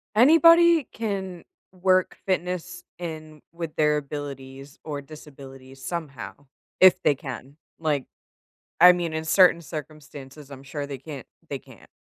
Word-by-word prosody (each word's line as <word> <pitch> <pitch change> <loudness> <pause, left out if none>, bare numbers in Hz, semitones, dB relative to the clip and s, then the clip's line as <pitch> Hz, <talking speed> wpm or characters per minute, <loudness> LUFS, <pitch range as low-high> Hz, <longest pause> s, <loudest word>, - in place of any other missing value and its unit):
anybody 330 +4 +6
can 190 -5 -4 0.3
work 185 0 +1
fitness 180 -2 -3 0.2
in 155 -3 -8
with 165 -2 -6
their 150 -1 +3
abilities 140 -1 -8
or 150 -2 -5
disabilities, 135 -2 -13
somehow 135 - -6 0.5
if 185 -1 +7
they 145 - +3
can, 135 +1 -9 0.2
like, 150 -4 -1 0.7
I 180 +2 +10
mean, 170 -2 -3
in 160 0 -3
certain 170 0 +5
circumstances, 150 -2 -10
I'm 135 -1 -11
sure 140 +1 -6
they 140 - -6
can't 135 -1 -10 0.2
they - - -4
can't. - - -18
155 Hz, 130 wpm, -24 LUFS, 140-180 Hz, 0.7 s, I